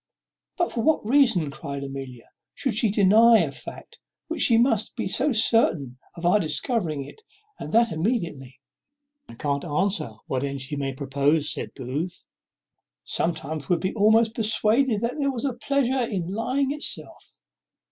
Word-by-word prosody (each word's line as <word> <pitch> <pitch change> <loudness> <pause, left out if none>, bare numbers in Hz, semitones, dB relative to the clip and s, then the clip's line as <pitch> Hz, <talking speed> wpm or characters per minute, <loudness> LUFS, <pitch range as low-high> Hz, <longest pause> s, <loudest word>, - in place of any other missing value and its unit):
"But 350 - 0
for 230 - -2
what 310 -3 +1
reason," 230 - +3
cries 140 -1 -6
Amelia, 135 -3 -8 0.2
"should 265 -5 -2
she 220 +1 +2
deny 215 +3 +5
a - - 0
fact, - - -10 0.3
when 330 - -4
she 230 - +5
must 230 -3 +2
be - - -3
so 270 +9 +2
certain 165 - +2 0.2
of 170 -1 -7
our 180 +4 +4
discovering 160 - -1
it, 435 - -14 0.4
and - - -7
that 230 +1 +3
immediately?" 160 - -3 0.7
"I - - -11
can't 140 -2 -2
answer 175 - -1
what 130 0 -2
end 140 -1 -4
she 140 +3 -5
may 135 -1 -3
propose," 140 +3 +1
said - - -7
Booth. 145 +7 -5 0.8
"Sometimes 155 -3 -3
one 180 - +4
would 170 - -5
be 190 - -2
almost 220 +1 +3
persuaded 220 +1 +1
that 240 +5 -2
there 280 -1 +1
was 255 +1 -4
a 270 - -1
pleasure 265 +1 0
in 190 -6 -3
lying 260 +5 -1
itself. 295 +1 -4
200 Hz, 160 wpm, -24 LUFS, 145-235 Hz, 0.8 s, deny